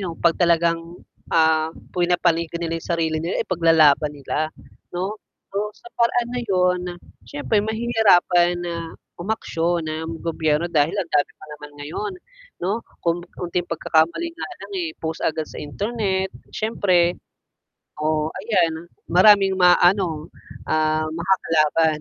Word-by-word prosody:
yung 170 -2 -5
'pag 170 -1 +3
talagang, 170 0 +1 0.4
ah, 160 -1 +3 0.2
pinapanigan 170 -2 +1
nila 165 -1 -2
yung - - -12
sarili 160 -2 0
nila, 170 +3 -2
ipaglalaban 160 -4 +4
nila. 150 +2 -2 0.4
'No? 190 +4 -3 0.4
So, 210 +1 -2
sa 235 - -14
paraan 235 0 +2
na 250 0 -2
yun, 180 -2 +2 0.5
siyempre 145 +7 -1
mahihirapan 205 -6 +3
na 170 -1 -3 0.5
umaksyon 175 -4 -1
ang 160 +1 -4
gobyerno, 160 -1 0
dahil 150 -1 +2
ang 170 - -2
dami 145 -1 +2
pa - - -14
naman 150 0 -11
ngayon, 385 - -4 0.5
'no? 205 +5 0 0.2
Kung 170 0 +1 0.2
onting 175 0 -2
pagkakamali 165 - +1
nga 335 - -6 0.2
lang, - - -11
eh, 340 - -2
post 160 0 -4
agad 155 0 0
sa - - -8
internet, 190 +3 -2 0.2
siyempre 185 -6 +1 0.9
oh, 155 0 +1
ayan 180 -5 0 0.3
maraming 195 +2 +6
maaano, 175 -3 +4 0.4
ah, 155 0 +1
makakalaban 160 -2 +2
170 Hz, 130 wpm, -22 LUFS, 160-190 Hz, 0.9 s, maraming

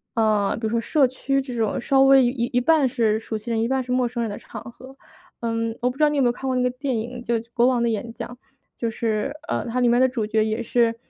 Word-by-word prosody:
嗯， 215 -3 +1
比 225 - -4
如 - - -4
说 230 0 +1
社 280 +2 +3
区 275 +2 -1
这 260 -2 -7
种 225 -3 0
稍 270 +2 +2
微 270 -1 +6
一 - - +3 0.2
一 245 - +2
半 295 0 +3
是 220 -3 +1
熟 220 0 -5
悉 220 +3 -6
人， 225 -1 0
一 230 - +1
半 265 0 0
是 250 - -6
陌 250 -1 +2
生 240 0 -4
人 225 - -2
的 205 - -5
场 - - -9
合。 265 +2 -14 0.4
嗯， 230 -1 -2
我 250 - +2
不 255 - -14
知 - - -4
道 300 - +6
你 295 - -1
有 275 - +3
没 - - +4
有 240 - +3
看 265 - -6
过 260 - 0
那 250 - +1
个 250 - +1
电 255 -1 -2
影， 240 +3 -5
就 235 -1 -1 0.2
《国 240 0 +3
王 250 -2 +2
的 235 - +2
演 225 +1 -3
讲》。 - - -6 0.5
就 230 - 0
是， 220 0 -2 0.2
呃， - - -2
它 240 +2 -1
里 245 - +3
面 240 +1 +4
的 260 - +4
主 240 -4 -2
角 215 0 +1
也 220 +2 -2
是， 230 0 +2
240 Hz, 315 characters per minute, -23 LUFS, 225-260 Hz, 0.5 s, 微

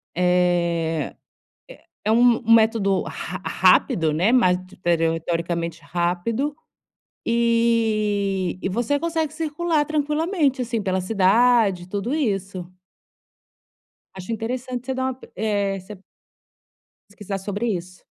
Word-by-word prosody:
eh, 175 -2 +1 0.9
é 215 - +1
um 240 0 +5
um 230 - +5
método 220 -4 +3
ra - - -6
rápido, 165 - +3
né, 180 +9 +2
mas 185 -8 +4
te 190 - -17 0.5
teoricamente 170 -1 -2
rápido, 175 - -1 0.7
eh, 220 -5 +1
e - - -1
você 240 +8 0
consegue 325 -3 -1
circular 315 -1 -1
tranquilamente 300 -1 0
assim 230 -2 -2
pela 190 -1 -1
cidade, 200 -1 +3
tudo 205 +7 -2
isso. 195 - -2 1.5
Acho 190 +4 -8
interessante 245 +2 -4
você 265 - -2
dar 260 - -2
uma 260 - -2
pe 255 - -16
eh, 200 -3 -1
você 205 +3 -11 1.1
pesquisar 205 -1 -6
sobre 205 +4 -3
isso. 185 -3 -4
215 Hz, 110 wpm, -22 LUFS, 185-245 Hz, 1.5 s, um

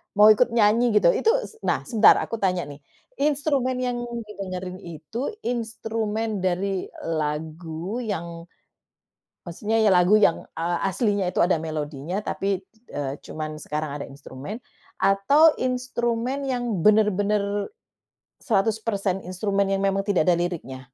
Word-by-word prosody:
mau 210 +1 +8
ikut 230 +4 +4
nyanyi 225 +1 +4
gitu. 175 -4 +6
Itu - - +1
s 445 - -11
nah, - - +1
sebentar, 225 -3 +6
aku 230 - -5
tanya 185 -2 +1
nih, 145 0 -10 0.4
instrumen 280 -3 +1
yang 245 -1 -1 0.3
didengerin 185 -3 -6
itu, 195 - -6
instrumen 225 -2 -2
dari 185 +1 -1 0.2
lagu 160 +5 -3
yang 170 -7 -5 1.0
maksudnya 210 +6 -1
ya 220 -2 +4
lagu 180 +4 +5
yang, 185 -5 +3 0.2
eee, 170 +1 0
aslinya 205 -1 0
itu - - -9
ada 175 0 +4
melodinya 155 +2 -4
tapi 195 -2 -2
di 220 - -33
eee, 140 -1 -3
cuma 155 0 -5 0.2
sekarang 150 0 -3
ada - - -7
instrumen? 140 +7 -8 0.4
Atau 280 +12 +5
instrumen 250 +1 -1
yang 240 -8 -1
bener-bener 205 -1 +2 0.7
100% 205 -3 0
instrumen 195 +2 0
yang 195 - +1
memang 195 0 +2
tidak 195 -6 +2
ada 175 - +6
liriknya? 170 -7 -4
200 Hz, 130 wpm, -24 LUFS, 175-225 Hz, 1.0 s, mau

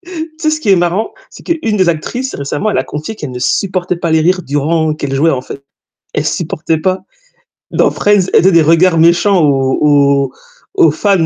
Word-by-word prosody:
Tu 320 0 -5
sais 310 - 0
ce 310 0 -1
qui 220 - -1
est 195 - +6
marrant? 175 +5 -1 0.2
C'est - - -14
qu'une 270 -11 -1
des 185 -3 +3
actrices, 245 +11 -3
récemment, 145 +9 -3
elle - - -1
a - - +1
confié 155 +9 -6
qu'elle 150 -9 -7
ne 125 - -6
supportait 180 +5 -1
pas 170 -1 -3
les 160 0 +3
rires 180 +3 +1
durant 155 +3 0
qu'elle 145 -3 -5
jouait 160 +4 +2
en 130 - -2
fait. 140 +2 -10 0.5
Elle 145 - -1
supportait 160 0 -2
pas. 185 +3 -1 0.7
Dans - - +2
Friends, 205 -3 +2
elle - - +6
faisait 190 +2 +4
des 170 - +5
regards 165 +2 +3
méchants 175 +3 +3
aux 135 -3 +1
aux 140 -2 +2 0.4
aux 160 - +4
fans. 185 +2 +1
165 Hz, 210 wpm, -13 LUFS, 150-190 Hz, 0.7 s, est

